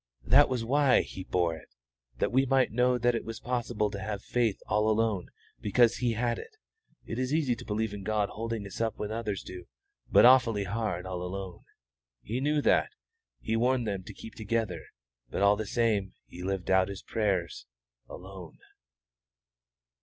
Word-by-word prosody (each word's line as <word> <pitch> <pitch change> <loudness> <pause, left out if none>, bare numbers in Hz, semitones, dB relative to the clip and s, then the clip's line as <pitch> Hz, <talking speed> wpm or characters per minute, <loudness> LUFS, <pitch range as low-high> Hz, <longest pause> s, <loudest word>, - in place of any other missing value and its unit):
"That 140 +6 +6
was 125 -3 -2
why 135 +1 +4
He 95 - -8
bore 85 -3 0
it, 70 - -15 0.4
that - - 0
we 135 +2 +3
might 135 0 +3
know 125 +2 +2
that 120 0 +2
it 115 - -2
was 115 0 -7
possible 120 -4 -1
to 100 - -5
have 100 0 -4
faith 115 -5 0
all 105 +1 +1
alone 110 -4 0 0.3
because 115 +3 +3
He 120 -1 0
had 120 +1 -1
it. 435 - -12 0.5
It 115 - -4
is 130 +1 -1
easy 145 -6 +1
to - - -10
believe 110 0 -2
in 100 - -6
God 105 0 0
holding 115 -1 -4
us 100 - -7
up 115 -1 -1
when 105 0 -4
others 110 -4 -3
do, 90 -1 -9 0.5
but - - +7
awfully 120 -5 +5
hard 110 +2 -3
all 90 -1 -4
alone. 90 0 -6 0.6
He 120 +5 -3
knew 150 +1 +1
that, - - +3 0.5
He 110 - -1
warned 125 +1 +2
them 100 -3 -2
to - - -9
keep 110 - -10
together; 110 -4 -2 0.4
but - - -1
all 100 +1 +6
the 110 0 -4
same 105 -5 0
He 90 - -11
lived 95 0 -2
out 95 0 +4
His 100 -1 -7
prayers 95 - -1 0.4
alone." 95 -3 -10
110 Hz, 180 wpm, -29 LUFS, 100-120 Hz, 0.6 s, but